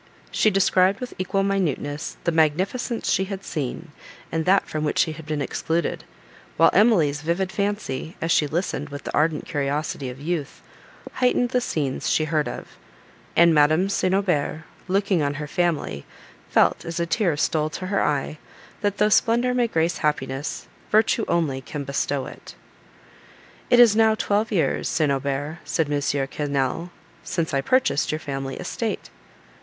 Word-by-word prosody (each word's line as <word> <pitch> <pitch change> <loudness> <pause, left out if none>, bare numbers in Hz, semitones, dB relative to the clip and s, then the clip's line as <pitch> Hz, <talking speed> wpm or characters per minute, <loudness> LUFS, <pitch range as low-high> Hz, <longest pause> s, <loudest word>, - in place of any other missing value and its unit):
She 215 - +3
described 190 -1 +3
with 250 -1 -6
equal 195 +1 0
minuteness 160 -7 -2
the 170 - +1
magnificence 180 +10 0
she 190 - +2
had 195 0 -6
seen, 150 +2 -4 0.4
and 160 0 -1
that 195 +2 +3
from 155 0 -3
which 150 - -1
she 160 - +3
had 155 0 -10
been 150 -2 -1
excluded; 165 +4 -2 0.5
while - - +6
Emily's 165 -10 +4
vivid 175 +4 -1
fancy, 200 -6 -3
as 165 - -1
she 150 - +3
listened 155 -1 -2
with 145 0 -8
the - - -6
ardent 155 0 +1
curiosity 140 -1 -2
of 125 +1 -9
youth, 155 -1 -4 0.5
heightened 250 -1 +2
the 250 0 +1
scenes 145 - -2
she 155 - +2
heard 155 -1 0
of; - - -8 0.6
and 170 0 +6
Madame 155 +5 +4
St. 185 -1 +1
Aubert, 160 -5 0 0.2
looking 195 -2 +1
on 145 0 0
her 150 0 -4
family, 155 - -1 0.5
felt, - - +3
as 165 0 -4
a 170 - +1
tear 165 -1 +1
stole 155 0 +1
to 185 +4 -6
her 195 +1 0
eye, 150 +1 -1 0.4
that 205 -1 0
though 210 - +4
splendour 235 +3 +3
may 245 -1 +2
grace 165 -4 0
happiness, 140 -2 -2 0.2
virtue 220 +1 +3
only 145 -6 0
can 140 +2 -6
bestow 140 0 -1
it. - - -11 1.1
"It 245 - +5
is 235 -3 +7
now 220 0 +4
twelve 215 +1 0
years, 185 -6 0
St. 155 -3 +1
Aubert," 140 +3 -2
said 155 -3 -1
M. 145 - 0 0.3
Quesnel, 145 +4 -2 0.3
"since 165 -4 -2
I 135 - +2
purchased 255 - +2
your 155 - -1
family 135 -3 -5
estate." - - -4
160 Hz, 160 wpm, -23 LUFS, 145-195 Hz, 1.1 s, is